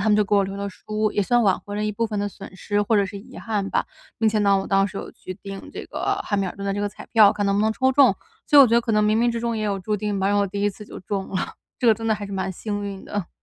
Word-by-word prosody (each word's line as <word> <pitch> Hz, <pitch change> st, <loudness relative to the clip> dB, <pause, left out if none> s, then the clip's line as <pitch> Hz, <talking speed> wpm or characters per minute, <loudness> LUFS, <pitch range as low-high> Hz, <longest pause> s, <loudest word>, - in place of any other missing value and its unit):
他 215 Hz, -, +1 dB
们 210 Hz, -, +5 dB
就 210 Hz, -, +3 dB
给 205 Hz, -, 0 dB
我 200 Hz, -, +5 dB
留 195 Hz, +1 st, -4 dB
了 200 Hz, 0 st, -3 dB
书， 215 Hz, +2 st, -2 dB
也 205 Hz, -, +1 dB
算 240 Hz, +4 st, +3 dB
挽 195 Hz, -3 st, +2 dB
回 205 Hz, 0 st, -7 dB
了 210 Hz, -, -1 dB
一 210 Hz, -, -1 dB
部 230 Hz, +3 st, -1 dB
分 210 Hz, -2 st, -3 dB
的 205 Hz, 0 st, -1 dB
损 195 Hz, -1 st, -12 dB
失 205 Hz, +1 st, 0 dB
或 215 Hz, +1 st, +2 dB
者 200 Hz, -1 st, +3 dB
是 200 Hz, +2 st, -8 dB
遗 250 Hz, +6 st, -12 dB
憾 205 Hz, -3 st, -2 dB
吧。 -, -, +1 dB, 0.3 s
并 220 Hz, -1 st, +3 dB
且 215 Hz, -, +1 dB
呢， 200 Hz, -1 st, +4 dB
我 195 Hz, -, -4 dB
当 195 Hz, 0 st, +3 dB
时 195 Hz, -, -10 dB
有 -, -, -7 dB
去 185 Hz, -, -9 dB
定 195 Hz, 0 st, -9 dB
这 -, -, -6 dB
个 -, -, -2 dB
汉 205 Hz, -, -1 dB
密 195 Hz, -, 0 dB
尔 -, -, -6 dB
顿 200 Hz, -, -6 dB
的 195 Hz, -, 0 dB
这 205 Hz, -, -2 dB
个 205 Hz, -, 0 dB
彩 205 Hz, -, -12 dB
票， 215 Hz, -3 st, +7 dB
看 205 Hz, -1 st, -2 dB
能 200 Hz, -, +2 dB
不 205 Hz, -, +2 dB
能 220 Hz, +1 st, +2 dB
抽 260 Hz, +3 st, +2 dB
中。 280 Hz, +1 st, +5 dB, 0.3 s
所 290 Hz, -, +7 dB
以 -, -, +12 dB
我 -, -, +7 dB
觉 230 Hz, -, +2 dB
得 235 Hz, -, +5 dB
可 230 Hz, -, -3 dB
能 210 Hz, 0 st, +3 dB
冥 215 Hz, +1 st, +3 dB
冥 240 Hz, +1 st, +3 dB
之 235 Hz, -, -3 dB
中 235 Hz, -1 st, -1 dB
也 215 Hz, -, -2 dB
有 200 Hz, -2 st, -1 dB
注 210 Hz, +3 st, -2 dB
定 205 Hz, -1 st, -2 dB
吧， 190 Hz, -, 0 dB
然 205 Hz, -, +2 dB
后 205 Hz, -, +3 dB
我 -, -, 0 dB
第 200 Hz, +1 st, -4 dB
一 205 Hz, -, +2 dB
次 210 Hz, +2 st, -12 dB
就 -, -, -9 dB
中 195 Hz, +1 st, -4 dB
了， 190 Hz, -1 st, -3 dB, 0.3 s
这 245 Hz, -, 0 dB
个 225 Hz, -, +8 dB
真 225 Hz, +1 st, -6 dB
的 220 Hz, -, +3 dB
还 205 Hz, -, -6 dB
是 200 Hz, -, -8 dB
蛮 190 Hz, 0 st, -2 dB
幸 205 Hz, +2 st, -4 dB
运 200 Hz, -1 st, -6 dB
的。 205 Hz, -5 st, -4 dB
205 Hz, 385 characters per minute, -23 LUFS, 195-215 Hz, 0.3 s, 以